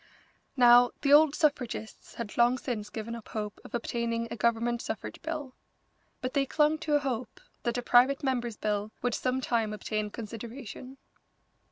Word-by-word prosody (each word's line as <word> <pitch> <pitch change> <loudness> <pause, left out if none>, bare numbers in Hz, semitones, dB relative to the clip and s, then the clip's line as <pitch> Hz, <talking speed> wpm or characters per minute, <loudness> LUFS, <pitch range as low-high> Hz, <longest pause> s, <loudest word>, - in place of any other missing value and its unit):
Now, 245 0 +7
the 280 -1 +4
old 300 0 +7
suffragists 270 -7 -2
had 230 -3 -6
long 240 +2 +4
since 220 -5 -4
given 220 +2 -5
up 230 -2 -8
hope 210 -2 -5
of - - -7
obtaining 230 -1 -2
a - - -3
Government 235 +1 +1
suffrage 220 - -6
bill, 310 -5 -5 0.7
but 255 0 -3
they 275 -1 +1
clung 300 +2 +2
to 310 -2 0
a - - +5
hope 255 -5 -4 0.2
that 235 0 -1
a 245 - -2
private 255 +4 +4
member's 240 -4 -1
bill 210 0 -1
would 245 -1 +1
some 255 +2 -1
time 225 -4 0
obtain 210 0 -3
consideration. 235 +4 -8
240 Hz, 165 wpm, -29 LUFS, 225-265 Hz, 0.7 s, Now